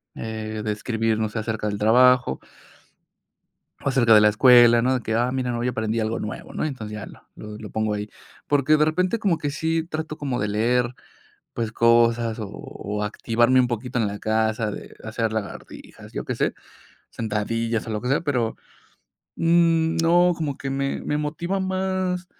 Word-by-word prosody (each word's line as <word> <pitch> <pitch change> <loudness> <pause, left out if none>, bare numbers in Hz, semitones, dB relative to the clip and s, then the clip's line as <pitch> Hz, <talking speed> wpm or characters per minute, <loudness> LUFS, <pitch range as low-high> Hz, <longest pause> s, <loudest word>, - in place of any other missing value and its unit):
Eh, 110 -1 -5
de 105 - 0
escribir, 110 0 -1
no 110 -1 0
sé, 110 - -7
acerca 110 -1 -3
del 105 - -3
trabajo 125 - +4 1.4
acerca 125 -5 +3
de 105 - +8
la 105 - +6
escuela, 120 +1 +6
¿no?, 130 +2 +2
de 130 - -1
que: 110 -1 -3
"Ah, 120 +2 +1
mira, 125 -2 -2
hoy 120 - -1
aprendí 110 -1 -2
algo 110 +1 -1
nuevo", 105 - -6
¿no? - - -2
Entonces, 115 -8 -5
ya 105 -3 -6
lo - - -14
lo 105 0 -9
lo 105 - -9
pongo 110 -1 -1
ahí. 105 0 -4 0.4
Porque 145 +1 +3
de 150 - +3
repente, 185 +8 0
como 190 -7 +1
que 145 - -2
sí 160 +2 -1
trato 155 -2 -5
como 135 -5 -3
de 105 - -1
leer, 120 +4 +1 0.6
pues, 115 -2 -3
cosas, 115 0 +3
o 105 - -5
o, 105 +1 -6
activarme 120 +4 +2
un 125 - +3
poquito 125 +1 -3
en 110 - +1
la 100 0 -6
casa, 110 0 0
de - - -9
hacer 110 0 -2
lagartijas, 110 -2 -7
yo - - -4
qué - - -3
sé, - - 0 0.6
sentadillas, 115 +1 -2
o, - - -3
lo 105 -1 -3
que 125 - -3
sea, 135 - +2
pero, 125 -8 -1 0.8
mm, 165 -1 +3
no, 175 +2 +4
como 145 -4 -3
que 135 - -5
me 135 0 -2
me 150 - -1
motiva 170 +6 -2
más 185 -1 -1
120 Hz, 185 wpm, -23 LUFS, 110-145 Hz, 1.4 s, de